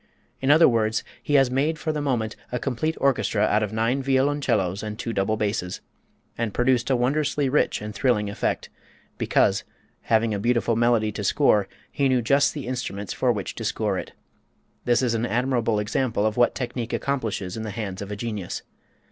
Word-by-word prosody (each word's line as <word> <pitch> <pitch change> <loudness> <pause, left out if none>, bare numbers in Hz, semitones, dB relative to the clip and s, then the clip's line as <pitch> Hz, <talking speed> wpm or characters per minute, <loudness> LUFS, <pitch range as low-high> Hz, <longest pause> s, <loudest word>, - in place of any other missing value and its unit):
In 135 - 0
other 160 +3 +7
words 110 -2 +1 0.2
he 145 - 0
has 135 -3 +5
made 145 +5 +1
for 160 - -2
the 150 -1 -2
moment 120 -6 -1 0.2
a 125 - -1
complete 140 +5 -2
orchestra 125 -6 +1
out 105 0 +3
of 105 -2 -2
nine 115 +5 0
violoncellos 130 -8 +1
and 105 0 -5
two 115 0 -4
double 110 +2 0
basses, 100 -3 -2 0.6
and 115 -3 -2
produced 125 0 +2
a 130 - +3
wondrously 140 +2 +1
rich 135 -6 +1
and 105 0 -5
thrilling 110 -5 +1
effect 100 - -2 0.5
because, - - +2 0.5
having 115 -1 +3
a 100 - -2
beautiful 115 +1 +1
melody 115 -2 +2
to 105 0 -5
score, 105 -3 +3 0.2
he 140 -1 +1
knew 125 -2 +2
just 140 +6 +3
the 145 - -5
instruments 120 -5 -4
for 125 - +2
which 100 -5 -3
to - - -7
score - - -1
it. - - -8 0.7
This 120 +1 +3
is 120 -2 +1
an 115 +1 0
admirable 120 -2 +1
example 105 +1 0
of 110 -1 0
what 120 0 +3
technique 120 -2 -4
accomplishes 110 -9 -2
in 110 - -4
the 110 - -4
hands 100 -2 -5
of 100 - -6
a - - -3
genius. 105 -4 -4
120 Hz, 190 wpm, -24 LUFS, 105-130 Hz, 0.7 s, other